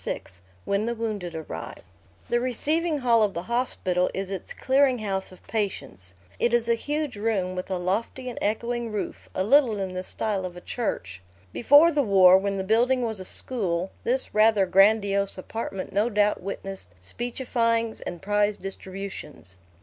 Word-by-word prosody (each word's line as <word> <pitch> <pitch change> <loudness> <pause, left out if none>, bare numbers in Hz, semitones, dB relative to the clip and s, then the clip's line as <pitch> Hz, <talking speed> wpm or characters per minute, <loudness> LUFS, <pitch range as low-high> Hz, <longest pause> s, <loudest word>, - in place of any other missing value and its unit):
VI - - -3 0.4
WHEN 200 +3 0
THE 235 - -1
WOUNDED 210 -7 -4
ARRIVE 115 - -7 0.4
The 240 - +1
receiving 300 +6 0
hall 240 -4 +3
of 205 -3 +1
the 170 - -3
hospital 185 -6 0
is 195 0 -3
its 190 -3 -5
clearing 265 -1 +2
house 195 -4 -3
of 185 - -17
patients. 95 - -4 0.2
It 240 0 +2
is 235 -1 0
a 235 - +4
huge 290 +1 -3
room, 200 -4 -1
with 185 +1 -5
a 190 - -1
lofty 210 +8 -2
and 245 - -5
echoing 235 +2 -2
roof, 210 - -5
a 185 - 0
little 235 -1 +4
in 190 -1 -3
the 185 - -3
style 195 +1 -3
of 180 -1 -6
a - - -9
church. 95 - -4 0.3
Before 290 +7 +6
the 295 -2 +2
war, 190 -6 +6
when 200 0 -2
the 190 - -2
building 240 +5 +2
was 220 -3 -2
a 185 - -6
school, 185 -6 +3
this 255 +2 -1
rather 215 -2 +4
grandiose 200 +1 +3
apartment 195 0 -5
no 210 +4 +2
doubt 210 -1 +1
witnessed 195 - -7
speechifyings 230 - -1
and 175 0 -7
prize 205 +1 +1
distributions. 190 - -8
210 Hz, 170 wpm, -25 LUFS, 190-235 Hz, 0.4 s, Before